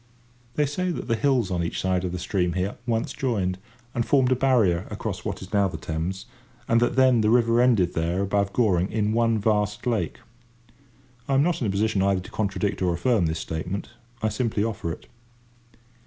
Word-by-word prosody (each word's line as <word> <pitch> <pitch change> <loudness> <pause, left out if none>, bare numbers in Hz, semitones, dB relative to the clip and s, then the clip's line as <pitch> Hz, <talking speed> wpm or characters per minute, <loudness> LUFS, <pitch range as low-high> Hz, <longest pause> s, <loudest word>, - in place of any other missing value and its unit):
They 150 - +2
say 180 +6 -2
that 170 - -4
the 115 - +2
hills 120 -4 +1
on 90 -1 0
each 85 - -3
ride 95 -1 +1
of 90 - -2
the 90 - -3
stream 90 -1 -1
here 95 +2 -2
once 115 -1 -1
joined 95 -8 -1 0.3
and 120 - 0
formed 130 0 +3
a - - +5
barrier 115 -10 +2
across - - -5
what - - -4
is 95 - -12
now 100 -1 +3
the 95 - -5
Thames, 80 +4 -4 0.4
and 115 - +4
that 120 - +1
then 130 -3 +5
the 105 - +2
river 115 0 +4
ended 115 -8 +3
there 85 +3 0
above 100 0 0
Goring 95 -6 +2
in 105 -1 0
one 115 -1 +2
vast 105 0 0
lake. 110 -9 -1 1.1
I 135 - +1
am 135 - +4
not 170 -2 0
in 115 - +1
a - - 0
position 100 +1 +1
either 95 -1 +2
to - - -12
contradict 100 -1 -2
or 90 -2 +1
affirm 100 -1 +2
this 80 +1 -2
statement. 80 +5 -4 0.3
I 110 - +2
simply 105 -1 -1
offer 105 -7 -3
it. - - -8
105 Hz, 200 wpm, -25 LUFS, 95-120 Hz, 1.1 s, a